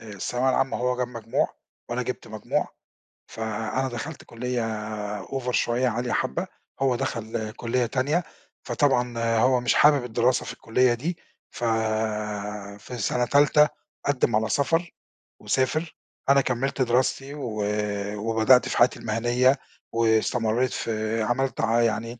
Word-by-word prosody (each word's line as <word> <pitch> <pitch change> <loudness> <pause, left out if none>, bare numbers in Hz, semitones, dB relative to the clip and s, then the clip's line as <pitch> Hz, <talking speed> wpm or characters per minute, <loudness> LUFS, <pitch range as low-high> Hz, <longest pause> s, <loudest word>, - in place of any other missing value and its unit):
آآ 115 - -12
الثانويه 125 +6 -1
العامة 135 +1 +1
هو 125 0 0
جاب 125 -1 -1
مجموع 115 -2 -1 0.4
وأنا - - -1
جِبت - - -5
مجموع، - - -2 0.6
فأنا 110 +4 -2
دخلْت 125 +6 -6
كُلّية 125 +1 -3 0.6
over 130 -2 -3
شوية، 125 +2 +1
عالية 120 +1 -1
حبّة، 65 - -1 0.3
هو 135 -2 +2
دَخَل 110 -2 -3
كُلّية 120 +2 -1
تانية، 140 +8 0 0.4
فطبعًا 125 -4 +1 0.2
هو 125 +2 +4
مش 120 - +2
حابب 145 -3 +5
الدراسة 125 +1 +1
في - - -5
الكُلّية 120 +2 +2
دي، 160 +9 -3 0.3
ف - - -8 1.2
في 125 +5 -8
سَنة 120 +3 0
تالتة، 145 +2 +5 0.4
قدِّم 130 -5 +2
على 110 +1 +1
سَفَر 165 +6 +1 0.5
وسافر. 155 +5 0 0.3
أنا 140 0 +6
كمّلت 135 +2 -1
دراستي 130 +3 +1
و 115 -8 -3 0.5
وبدأت 115 +4 +4
في - - -2
حياتي 120 - +4
المهنيّة 120 +4 +2 0.3
واستمرّيت 115 +1 +2
في 110 0 -2
عملت 130 +4 0
ع 115 +1 +3
يعني 115 +1 -1
125 Hz, 130 wpm, -25 LUFS, 115-130 Hz, 1.2 s, أنا